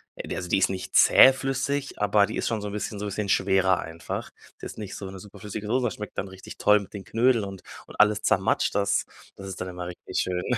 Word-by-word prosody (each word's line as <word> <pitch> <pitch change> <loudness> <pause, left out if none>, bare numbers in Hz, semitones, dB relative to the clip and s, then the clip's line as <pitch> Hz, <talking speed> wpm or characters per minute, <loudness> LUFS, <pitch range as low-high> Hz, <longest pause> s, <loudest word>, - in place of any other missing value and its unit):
äh, - - -7
d - - -4
also, 90 - -4
die - - +3
ist - - +3
nicht 95 -1 -5
zähflüssig, 135 0 +4
aber 105 0 +4
die - - -5
ist - - -1
schon 110 -2 -1
so 105 - -4
'n 100 - -8
bisschen 105 0 -4
so 105 - -4
'n - - -3
bisschen 105 +1 -3
schwerer 95 -1 +3
einfach. 80 0 -6 0.3
Die - - -7
ist - - -11
nicht 105 -3 -6
so 95 -1 -7
'ne 95 - -9
super 100 +1 -13
flüssige 105 0 -6
Soße, 125 +3 +1
das 115 - -2
schmeckt 105 -1 -8
dann 95 - -3
richtig 95 0 -11
toll 105 0 +5
mit 100 - -13
den 100 -2 -7
Knödel 115 -1 +2
und 95 -1 -8 0.3
und - - -13
alles 105 0 +4
zermatscht. - - +2
Das 100 -1 +2 0.3
das 95 - -9
ist 95 - -7
dann 95 - -3
immer 90 -1 -6
richtig 90 - -7
schön. 90 -1 -2
100 Hz, 260 wpm, -26 LUFS, 95-105 Hz, 0.3 s, toll